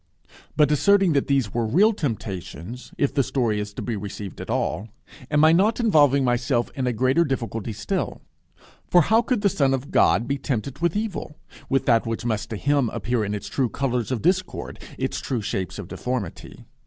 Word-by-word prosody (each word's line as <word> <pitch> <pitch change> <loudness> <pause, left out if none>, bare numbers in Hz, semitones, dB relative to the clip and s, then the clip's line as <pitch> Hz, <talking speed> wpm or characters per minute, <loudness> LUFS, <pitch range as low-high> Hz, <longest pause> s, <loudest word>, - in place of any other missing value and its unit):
But 150 -1 +4
asserting 195 +3 +4
that 140 - +1
these 135 -8 +1
were 120 - 0
real 190 - +4
temptations 110 - -5
if 140 - +1
the 140 - +3
story 120 -5 0
is 105 0 -4
to - - -5
be 120 - -2
received 100 -1 -7
at - - -8
all, 105 +4 -1 0.4
am 150 +1 +4
I 160 - +7
not 205 +8 +3
involving 145 - +4
myself 120 0 0
in 130 -2 -2
a - - +2
greater 130 +7 +2
difficulty 115 -6 -3
still? 105 - -3 0.7
For 175 - +5
how 220 +8 +4
could 240 -3 -1
the 205 - +3
Son 135 -7 +2
of 135 +2 -7
God 120 - +3
be 140 +1 -1
tempted 130 -1 -3
with 170 0 0
evil 210 -8 -3 0.3
with 135 0 +1
that 115 -2 +3
which 115 +1 -3
must 110 -3 -1
to 110 - -4
him 140 0 +1
appear 120 0 -1
in 105 0 -2
its 100 - -6
true 130 -4 0
colours 125 -2 -2
of 125 - -2
discord, 185 +2 -1 0.2
its - - -2
true 120 -5 -3
shapes 95 -4 -3
of - - -7
deformity? 125 -8 -5
130 Hz, 195 wpm, -24 LUFS, 115-150 Hz, 0.7 s, I